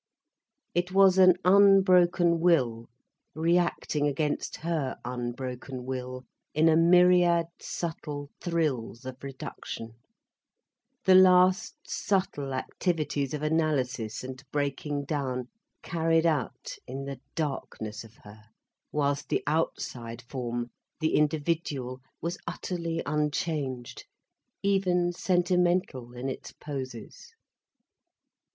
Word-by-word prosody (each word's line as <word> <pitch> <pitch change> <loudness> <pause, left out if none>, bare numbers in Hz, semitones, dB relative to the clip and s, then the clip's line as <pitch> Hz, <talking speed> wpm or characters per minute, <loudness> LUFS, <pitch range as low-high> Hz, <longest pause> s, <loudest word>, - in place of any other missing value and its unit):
It 175 +1 0
was 190 -1 +5
an 185 -1 +8
unbroken 185 -3 +5
will 125 -10 +2 0.5
reacting 165 -2 +1
against 150 +1 -1
her 160 -5 -2
unbroken 125 +1 -5
will 130 0 -5 0.3
in 155 +2 +4
a 160 - +5
myriad 175 0 +5
subtle 150 -4 -5
thrills 145 -9 -1
of 130 +1 -8
reduction, 130 -4 -7 1.1
the 190 - +6
last 185 +2 +5
subtle 185 -8 -1
activities 150 0 -1
of 150 - -5
analysis 140 -9 0
and 130 +1 -8
breaking 145 0 -2
down, 130 -4 -2 0.3
carried 165 -1 +1
out 155 -6 -1
in 135 +2 -5
the 140 -2 -6 0.2
darkness 120 -7 -4
of 115 0 -16
her, 105 +1 -14 0.5
whilst 145 -1 0
the - - 0
outside 120 -6 -2
form, 120 -1 -4 0.3
the 160 -1 0
individual, 150 -4 0 0.2
was 170 +1 -3
utterly 170 -2 -3
unchanged, 145 -4 -2 0.6
even 180 -3 +2
sentimental 175 -8 +1
in 125 +2 -4
its 135 - -6
poses. 130 -6 -8
150 Hz, 100 wpm, -28 LUFS, 130-175 Hz, 1.1 s, an